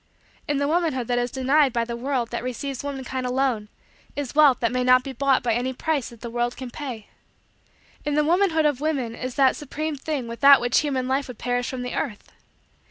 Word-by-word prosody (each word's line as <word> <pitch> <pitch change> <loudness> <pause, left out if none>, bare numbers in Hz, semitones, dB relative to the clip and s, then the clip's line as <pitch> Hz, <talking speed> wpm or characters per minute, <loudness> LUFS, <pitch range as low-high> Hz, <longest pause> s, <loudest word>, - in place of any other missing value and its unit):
In 290 -2 0
the 285 0 0
womanhood 315 -6 0
that 245 0 +2
is 245 0 -1
denied 270 +2 +2
by 235 0 0
the 235 0 -4
world 250 -1 -2
that 235 - -3
receives 260 +2 -4
womankind 265 -2 -4
alone, 250 -5 0 0.5
is 285 -3 -4
wealth 290 -4 +5
that 235 - +1
may 250 0 0
not 255 0 +5
be 270 - -6
bought 270 +1 +2
by 235 -2 +1
any 250 +3 -1
price 295 -1 -1
that 235 -2 -15
the 235 - -5
world 240 +1 -1
can 255 -2 -7
pay. 245 -8 -6 1.0
In 295 -1 -1
the 300 - +3
womanhood 330 -1 +2
of 290 -3 +1
women 275 -7 -1
is 255 +1 -5
that 270 -2 +4
supreme 305 +2 -4
thing 275 -3 -4
without 275 +4 +6
which 245 0 +2
human 265 -4 -1
life 270 +2 0
would 250 -3 -9
perish 245 +1 -1
from 255 -1 -4
the 250 - -4
earth. 225 -9 -4
260 Hz, 215 wpm, -24 LUFS, 245-285 Hz, 1.0 s, without